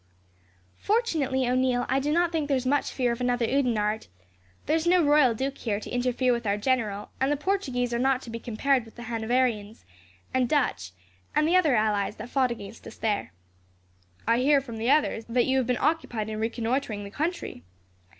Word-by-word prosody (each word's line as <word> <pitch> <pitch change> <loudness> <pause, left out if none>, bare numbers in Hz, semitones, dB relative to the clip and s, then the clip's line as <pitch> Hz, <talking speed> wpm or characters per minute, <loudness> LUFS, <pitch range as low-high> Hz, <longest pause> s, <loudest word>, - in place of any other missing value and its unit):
"Fortunately, 305 - 0
O'Neil, 250 0 +1
I 265 +1 +1
do 290 +2 -1
not 340 +1 +2
think 315 -3 -1
there 275 -2 +2
is 255 - -4
much 285 +2 +1
fear 250 -3 0
of 235 - -4
another 245 -1 +1
Oudenarde. 225 -5 0 0.6
There 305 - +2
is 325 +1 0
no 355 0 +5
royal 290 -5 +4
duke 270 +4 -3
here, 205 -4 -1
to - - -9
interfere 250 0 +1
with 235 -2 -3
our 200 0 +1
general; 210 -3 -1
and 265 +2 +1
the 295 - +1
Portuguese 270 -9 -1
are 235 - 0
not 265 0 +2
to 230 - -8
be 230 - -5
compared 245 +3 0
with 225 - -16
the 240 - -9
Hanoverians, 230 -2 -1 0.5
and 255 -2 +1
Dutch, 170 - 0 0.4
and 305 - +3
the 345 - +3
other 320 -8 +4
allies 210 -2 +1
that 225 +3 -8
fought 265 -2 +2
against 225 -2 -8
us - - -10
there." 210 -2 -1 1.0
"I 230 +1 +3
hear, 280 +2 +4
from 240 -4 -8
the 230 +3 -1
others, 290 -5 +2
that 240 +1 +2
you 265 0 +1
have 250 - -1
been 250 -2 +1
occupied 240 -9 -1
in 215 0 -4
reconnoitring 230 -1 -2
the 200 - -8
country." 315 - -3
250 Hz, 200 wpm, -27 LUFS, 225-280 Hz, 1.0 s, no